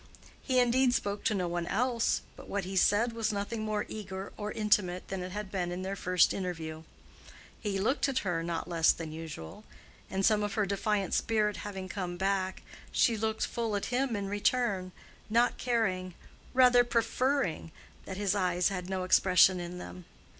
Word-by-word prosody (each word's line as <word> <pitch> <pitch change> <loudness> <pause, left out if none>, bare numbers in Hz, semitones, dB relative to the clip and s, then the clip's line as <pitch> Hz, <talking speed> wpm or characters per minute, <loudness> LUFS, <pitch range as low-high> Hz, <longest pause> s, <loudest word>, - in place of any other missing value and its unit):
He 255 - 0
indeed 250 +1 +4
spoke 200 0 -2
to 215 - +2
no 180 -2 0
one 175 0 -2
else, 235 +3 +1
but - - -12
what 200 -1 -1
he 190 +1 -5
said 215 +5 +3
was 225 -2 -1
nothing 210 +2 -3
more 215 -1 -1
eager 195 -2 -6
or 210 0 -4
intimate 205 -5 +1
than 190 -1 -3
it 180 0 -5
had 205 0 -5
been 180 -3 -2
in 180 +1 -4
their 195 +1 -3
first 180 -2 +3
interview. 165 -4 -4 0.8
He 205 -3 -2
looked 255 +8 +1
at 265 - -1
her 175 -3 0
not 170 0 -3
less 170 -2 +4
than 160 -2 -7
usual; 155 - -8 0.5
and 195 0 0
some 215 -1 +4
of 205 -1 -2
her 210 - +2
defiant 200 -1 -1
spirit 210 -2 +1
having 195 -2 -6
come 180 -2 -4
back, 190 0 -1 0.3
she 230 - +3
looked 220 0 -1
full 230 -3 -2
at 200 - -1
him 255 -1 +1
in 200 -1 -3
return, 205 -2 0 0.4
not 235 +3 +2
caring—rather 235 +3 +2
preferring—that 235 - -2
his 200 -2 +1
eyes 180 -2 +1
had 180 -2 -4
no 190 -1 -2
expression 185 0 +5
in 175 +1 -6
them. 90 - -9
195 Hz, 175 wpm, -30 LUFS, 180-220 Hz, 0.8 s, expression